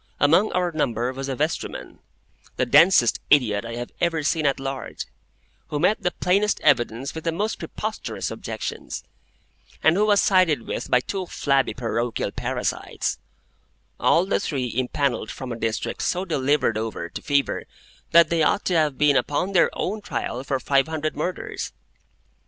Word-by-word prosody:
Among 165 Hz, +9 st, +4 dB
our 180 Hz, -1 st, +1 dB
number 125 Hz, -5 st, -1 dB
was 135 Hz, +1 st, -5 dB
a 135 Hz, -, -2 dB
vestryman,—the 155 Hz, +5 st, -5 dB
densest 150 Hz, -5 st, +5 dB
idiot 115 Hz, -8 st, +4 dB
I 115 Hz, 0 st, -6 dB
have 120 Hz, 0 st, -5 dB
ever 165 Hz, -3 st, +1 dB
seen 155 Hz, 0 st, +1 dB
at 140 Hz, -, +1 dB
large,—who 135 Hz, +2 st, -7 dB
met 200 Hz, +7 st, +2 dB
the 180 Hz, -, +1 dB
plainest 195 Hz, +4 st, +1 dB
evidence 130 Hz, -2 st, +1 dB
with 160 Hz, -, -6 dB
the 165 Hz, -, 0 dB
most 210 Hz, +6 st, -2 dB
preposterous -, -, -4 dB
objections, -, -, -5 dB, 0.8 s
and 160 Hz, -, +5 dB
who 210 Hz, +2 st, +2 dB
was 205 Hz, -1 st, +5 dB
sided 180 Hz, -, +3 dB
with -, -, -4 dB
by 125 Hz, -, +4 dB
two 190 Hz, +5 st, -4 dB
flabby 140 Hz, -5 st, +1 dB
parochial 120 Hz, -1 st, -2 dB
parasites; -, -, -2 dB, 0.8 s
all 170 Hz, -, +4 dB
the 195 Hz, -, +1 dB
three 130 Hz, -5 st, -2 dB
impanelled 130 Hz, -2 st, -1 dB
from 130 Hz, -2 st, -6 dB
a -, -, -3 dB
district 115 Hz, -1 st, -3 dB
so 185 Hz, +1 st, 0 dB
delivered 145 Hz, -, +1 dB
over 110 Hz, -6 st, -4 dB
to -, -, -8 dB
Fever 140 Hz, -1 st, 0 dB, 0.4 s
that 170 Hz, -1 st, +6 dB
they 165 Hz, -1 st, +2 dB
ought 180 Hz, +6 st, +2 dB
to 180 Hz, -, +1 dB
have 155 Hz, -4 st, +2 dB
been 150 Hz, -1 st, +4 dB
upon 150 Hz, +8 st, 0 dB
their 180 Hz, -3 st, +4 dB
own 210 Hz, +3 st, -3 dB
trial 125 Hz, -9 st, -4 dB
for 135 Hz, -1 st, -1 dB
five 135 Hz, +3 st, +2 dB
hundred 155 Hz, -1 st, -3 dB
Murders. 175 Hz, +5 st, -4 dB
145 Hz, 160 wpm, -24 LUFS, 130-170 Hz, 0.8 s, that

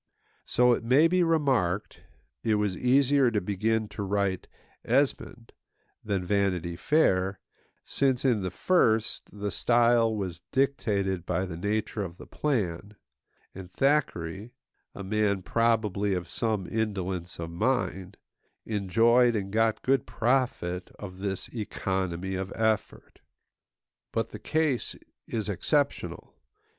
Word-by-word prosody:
So, 125 Hz, 0 st, +4 dB
it 115 Hz, -, -2 dB
may 135 Hz, +7 st, +5 dB
be 180 Hz, +2 st, +2 dB
remarked, 135 Hz, -, +1 dB, 0.4 s
it 110 Hz, -2 st, +2 dB
was 105 Hz, -3 st, 0 dB
easier 135 Hz, +3 st, +3 dB
to 110 Hz, -3 st, 0 dB
begin 105 Hz, +3 st, 0 dB
to -, -, -6 dB
write 100 Hz, -1 st, -1 dB, 0.4 s
Esmond -, -, -1 dB, 0.5 s
than 100 Hz, -4 st, -2 dB
Vanity 90 Hz, -3 st, 0 dB
Fair, 95 Hz, -, +2 dB, 0.5 s
since, 135 Hz, -2 st, +1 dB
in 120 Hz, -6 st, +3 dB
the 95 Hz, -, -2 dB
first, 110 Hz, -, +1 dB
the 105 Hz, 0 st, -4 dB
style 115 Hz, -1 st, +3 dB
was 90 Hz, -4 st, -4 dB
dictated 100 Hz, -9 st, 0 dB
by 90 Hz, +1 st, -1 dB
the 90 Hz, -3 st, -6 dB
nature 105 Hz, +4 st, -2 dB
of 90 Hz, -3 st, -6 dB
the -, -, -11 dB
plan; 105 Hz, -, -2 dB, 0.6 s
and 95 Hz, -1 st, -10 dB
Thackeray, 115 Hz, -, 0 dB, 0.4 s
a 100 Hz, -, -6 dB
man 100 Hz, -1 st, 0 dB
probably 105 Hz, -3 st, +1 dB
of 90 Hz, -2 st, -4 dB
some 100 Hz, +2 st, -1 dB
indolence 95 Hz, -5 st, -3 dB
of 85 Hz, 0 st, -5 dB
mind, 95 Hz, -2 st, -1 dB, 0.5 s
enjoyed 115 Hz, +4 st, +3 dB
and 100 Hz, -1 st, -3 dB
got 110 Hz, 0 st, +1 dB
good 135 Hz, -2 st, +1 dB
profit 115 Hz, -8 st, 0 dB
of 95 Hz, -3 st, -9 dB
this 95 Hz, -1 st, -3 dB
economy 95 Hz, -4 st, -3 dB
of 95 Hz, 0 st, -3 dB
effort. 110 Hz, -1 st, -2 dB, 0.9 s
But -, -, -2 dB
the -, -, -8 dB
case 155 Hz, -6 st, 0 dB, 0.3 s
is 110 Hz, -2 st, -3 dB
exceptional. 140 Hz, -, -1 dB
105 Hz, 125 wpm, -28 LUFS, 95-120 Hz, 0.9 s, may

